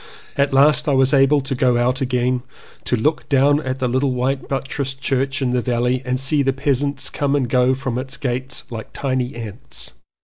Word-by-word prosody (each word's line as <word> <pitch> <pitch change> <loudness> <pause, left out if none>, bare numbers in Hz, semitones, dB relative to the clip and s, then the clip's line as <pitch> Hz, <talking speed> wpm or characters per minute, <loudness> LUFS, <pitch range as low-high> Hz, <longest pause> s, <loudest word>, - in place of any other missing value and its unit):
At 140 0 +1
last 145 +3 +4
I 140 - +3
was 135 +1 +3
able 140 +1 +4
to 135 +1 -4
go 125 -2 +2
out 125 +3 +1
again, 125 -1 0 0.4
to - - +1
look 150 +7 -1
down 145 +1 +4
at 130 -2 -3
the 130 -1 -1
little 130 +2 +1
white 130 +2 -1
buttressed 135 0 -3
church 135 0 -1
in 125 - 0
the 125 0 +1
valley 125 +1 0
and 125 0 -1
see 140 +2 +3
the 135 -1 +2
peasants 140 0 -1
come 145 -1 0
and 135 -4 +1
go 125 +2 +3
from 130 -2 -3
its 135 +3 -4
gates 130 0 -3
like 110 -2 -7
tiny 130 -2 -2
ants. 110 - -6
130 Hz, 200 wpm, -20 LUFS, 125-140 Hz, 0.4 s, last